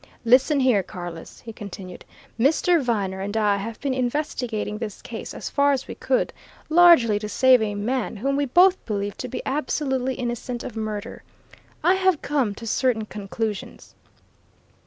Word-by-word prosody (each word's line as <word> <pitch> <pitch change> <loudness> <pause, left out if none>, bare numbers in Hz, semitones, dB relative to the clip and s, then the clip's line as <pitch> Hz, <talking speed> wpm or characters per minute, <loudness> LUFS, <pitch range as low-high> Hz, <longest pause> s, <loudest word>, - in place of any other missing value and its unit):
"Listen 270 +5 +4
here, 250 -6 +4
Carless!" 175 -3 -9
he 225 - -9
continued. 190 -3 -9 0.3
"Mr. 315 +6 +3
Viner 200 -6 -1
and 205 +3 -3
I 205 -2 +2
have 220 +3 -6
been 275 -2 -1
investigating 245 -5 -2
this 215 -4 -5
case - - -7
as - - -6
far 285 0 +3
as 265 - -3
we - - -6
could, - - 0 0.4
largely 315 -11 +6
to 210 0 -5
save 260 +1 +5
a 210 -2 -1
man 240 +4 -2
whom 275 +7 -1
we 285 0 +1
both 360 +7 +4
believe 205 -2 -2
to 255 - -5
be 250 - -5
absolutely 265 -2 -1
innocent 240 0 -4
of 235 - -7
murder. 215 -2 -5 0.6
I 360 - +5
have 375 -4 +1
come 265 -8 0
to 230 - -9
certain 230 -1 0
conclusions. 210 0 -5
240 Hz, 160 wpm, -24 LUFS, 210-275 Hz, 0.6 s, largely